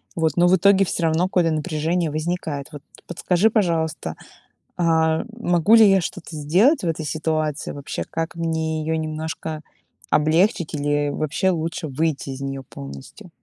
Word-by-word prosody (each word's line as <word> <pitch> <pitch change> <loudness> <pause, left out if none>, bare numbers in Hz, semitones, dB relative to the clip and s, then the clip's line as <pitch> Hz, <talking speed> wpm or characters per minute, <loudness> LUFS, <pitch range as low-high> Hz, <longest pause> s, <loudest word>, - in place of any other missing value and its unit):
Вот, 160 -3 +1
но 175 - +5
в 180 - +5
итоге 195 +2 +5
всё 170 - -3
равно 165 +2 +2
какое-то 175 -3 +2
напряжение 155 +1 -1
возникает. 155 -2 -3
Вот 145 - -8 0.3
подскажи, 180 +4 +1
пожалуйста, 160 - 0 0.6
а, 160 -1 +2
могу 175 -1 +3
ли 225 -2 +8
я 195 - +4
что-то 170 -1 -6
сделать 185 - +3
в - - 0
этой 160 -1 -2
ситуации 155 -1 -2
вообще? 140 -1 -5
Как 165 +1 -3
мне 160 -1 -1
её 160 +1 -1
немножко 155 0 -4 0.5
облегчить 165 +3 +2
или 145 0 0
вообще 155 +6 0
лучше 165 0 -3
выйти 145 0 -2
из 135 0 -7
неё 135 0 -4
полностью? 70 -1 -10
160 Hz, 150 wpm, -22 LUFS, 155-175 Hz, 0.6 s, ли